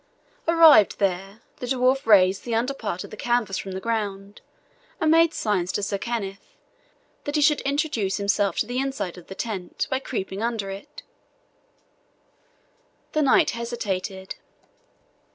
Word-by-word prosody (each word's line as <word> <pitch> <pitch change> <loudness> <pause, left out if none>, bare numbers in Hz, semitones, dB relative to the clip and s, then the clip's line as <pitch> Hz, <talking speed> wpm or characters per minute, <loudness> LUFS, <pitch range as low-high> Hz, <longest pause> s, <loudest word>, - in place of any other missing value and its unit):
Arrived 325 - +7
there, 195 +2 -2 0.2
the 250 - -6
dwarf 260 +1 +1
raised 190 -2 +5
the 235 -2 -2
under 245 +4 0
part 205 -8 -4
of - - -11
the - - -7
canvas 235 -4 0
from 190 - -6
the 190 - -4
ground, 200 -2 -3 0.6
and 315 -1 +3
made 330 0 +5
signs 190 - -1
to 205 - -2
Sir 200 -1 -2
Kenneth 200 -4 -5 0.7
that 290 - -3
he 300 - +2
should 300 0 +4
introduce 275 -9 -1
himself 200 -2 0
to - - +1
the 245 +3 -3
inside 265 -10 -3
of 170 - -17
the 190 - -8
tent, 195 -6 -4
by 260 - +1
creeping 195 -6 -4
under 225 -4 -2
it. 200 +10 -10 2.1
The 310 - +1
knight 275 - +4
hesitated. 200 -5 -4
220 Hz, 150 wpm, -24 LUFS, 195-260 Hz, 2.1 s, Arrived